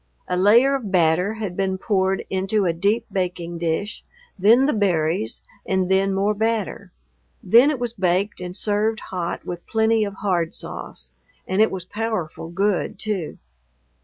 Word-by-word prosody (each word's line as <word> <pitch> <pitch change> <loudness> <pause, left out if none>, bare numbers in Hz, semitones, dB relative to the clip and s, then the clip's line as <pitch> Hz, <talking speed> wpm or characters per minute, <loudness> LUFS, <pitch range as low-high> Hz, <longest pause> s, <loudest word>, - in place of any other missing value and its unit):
A 180 - -1
layer 225 +9 +5
of 255 -7 -2
batter 180 +3 +2
had 205 -5 -4
been 190 -1 -1
poured 190 -1 0
into 195 +2 +1
a 170 - +2
deep 205 +7 +1
baking 175 -2 -3
dish, 170 +5 -2 0.3
then 225 +7 +5
the 295 - +2
berries, 165 - 0 0.2
and 190 -1 0
then 195 +1 +3
more 195 +2 +1
batter. 220 -1 -2 0.5
Then 235 +9 +6
it 300 - 0
was 240 -2 -3
baked 190 -1 0
and 180 +1 -5
served 215 +1 0
hot 180 -2 -3
with 175 -1 -6
plenty 220 0 +2
of 200 -1 -4
hard 180 -5 -1
sauce; - - -5 0.4
and 190 +3 +1
it 220 - +5
was 185 -2 -5
powerful 205 -7 -4
good, 195 +2 0
too. 200 -6 -3
195 Hz, 160 wpm, -22 LUFS, 180-215 Hz, 0.5 s, Then